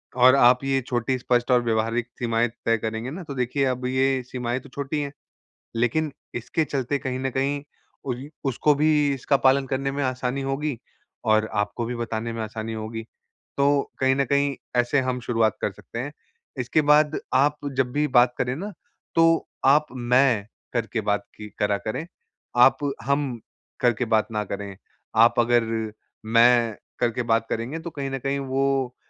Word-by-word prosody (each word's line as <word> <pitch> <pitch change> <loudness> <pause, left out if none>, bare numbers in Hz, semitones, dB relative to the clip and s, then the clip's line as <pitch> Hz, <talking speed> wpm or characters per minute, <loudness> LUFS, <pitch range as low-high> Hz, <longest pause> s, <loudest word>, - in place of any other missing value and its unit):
और 130 +1 +7
आप 125 -1 +5
ये 135 0 +1
छोटी 125 +1 0
स्पष्ट 120 0 +1
और 125 -1 +5
व्यावहारिक 115 +1 0
सीमाएँ 115 -1 +1 0.2
तय 115 0 +3
करेंगे 110 +2 -4
ना, 180 +5 -6
तो 145 - -7
देखिए 125 +2 0
अब 125 -1 -1
ये 130 +1 +1
सीमाएँ 125 0 -2
तो - - -15
छोटी 140 +3 -3
हैं। 140 -1 -4 0.6
लेकिन 130 +7 +1 0.2
इसके 120 +7 -1
चलते 140 0 -1
कहीं 130 0 -2
न 135 0 -1
कहीं 140 +1 0 0.4
उ 130 - -1 0.4
उसको 150 +4 +3
भी 155 +2 +2 0.2
इसका 135 +1 +1
पालन 135 +1 +3
करने 135 +1 -1
में 140 +1 -2
आसानी 130 +1 -1
होगी 135 0 -2 0.5
और 110 -1 +3
आपको 115 +3 -3
भी 120 +1 -3
बताने 115 0 -3
में 115 - -4
आसानी 110 +1 -5
होगी। 110 +1 -5 0.6
तो 140 0 +3 0.3
कहीं 130 0 +3
न 140 0 +1
कहीं 140 +1 +1 0.2
ऐसे 120 +4 +2
हम 125 -1 -1
शुरुआत 115 -2 +1
कर - - 0
सकते 115 +4 -9
हैं। 140 +4 -4 0.5
इसके 155 - +2
बाद 150 +1 +4
आप 145 +3 +3 0.2
जब 130 -2 +1
भी 150 +1 +1
बात 125 -2 +4
करें 125 +1 -1
ना 200 +8 -5 0.4
तो 165 0 +4 0.2
आप, 145 +3 +5
मैं 125 -3 +2 0.5
के 115 - 0
बात 105 -1 0
कि 105 0 -9
करा 105 -1 +2
करें, 110 +11 -4 0.5
आप - - +7 0.3
हम 140 -2 0 0.4
करके 120 -1 +2
बात 110 -1 +2
ना 105 -1 -1
करें। 100 0 -6 0.4
आप 115 +2 +5
अगर 120 0 +3 0.6
मैं 115 0 +4 0.2
करके 120 0 0
बात 115 -1 +1
करेंगे 125 +8 -3
तो 170 - -6
कहीं 140 -3 -4
न 135 - -3
कहीं 135 +2 -1
वो 135 -1 0
125 Hz, 175 wpm, -24 LUFS, 115-140 Hz, 0.6 s, और